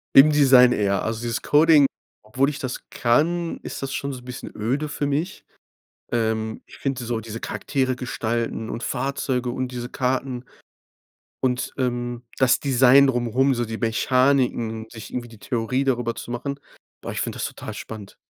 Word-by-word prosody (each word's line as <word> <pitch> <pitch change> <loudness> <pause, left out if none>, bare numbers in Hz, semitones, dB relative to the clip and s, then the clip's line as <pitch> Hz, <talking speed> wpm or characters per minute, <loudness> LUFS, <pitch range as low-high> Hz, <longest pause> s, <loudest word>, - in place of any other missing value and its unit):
Im 135 +3 +10
Design 130 -4 +6
eher. 100 -2 +1
Also 115 +1 -2
dieses 115 -1 -2
Coding, 150 -2 +6 0.4
obwohl 130 +6 +1
ich 150 - -6
das 130 -1 -5
kann, 165 +8 +1
ist - - -6
das 135 0 -3
schon 140 0 -3
so 130 - -7
'n 125 - -17
bisschen 125 -1 -7
öde 135 +8 -1
für 145 0 -2
mich. 155 +6 -2 0.7
Ähm, 110 -1 -1
ich - - -14
finde 135 -3 -2
so 115 -1 -2
diese 115 +1 -7
Charaktere 130 -3 -1
gestalten 115 -2 -2
und 115 - -4
Fahrzeuge 130 -1 -1
und 130 +1 -2
diese 120 0 -5
Karten 130 -1 -2 1.0
und, 125 -1 0
ähm, 120 -1 -2 0.2
das 130 -1 +4
Design 135 0 +6
drumherum, 125 +2 +2
so 120 -1 -1
die 110 0 -5
Mechaniken, 120 -1 +1
sich 110 -2 -10
irgendwie 120 -1 -4
die 115 -2 -14
Theorie 125 +3 -1
darüber 120 -3 0
zu 120 - -7
machen. 140 +3 -4 0.4
Boah, - - -5
ich - - -4
finde - - -3
das - - -1
total - - -6
spannend. 105 -3 -9
125 Hz, 170 wpm, -23 LUFS, 115-135 Hz, 1.0 s, Im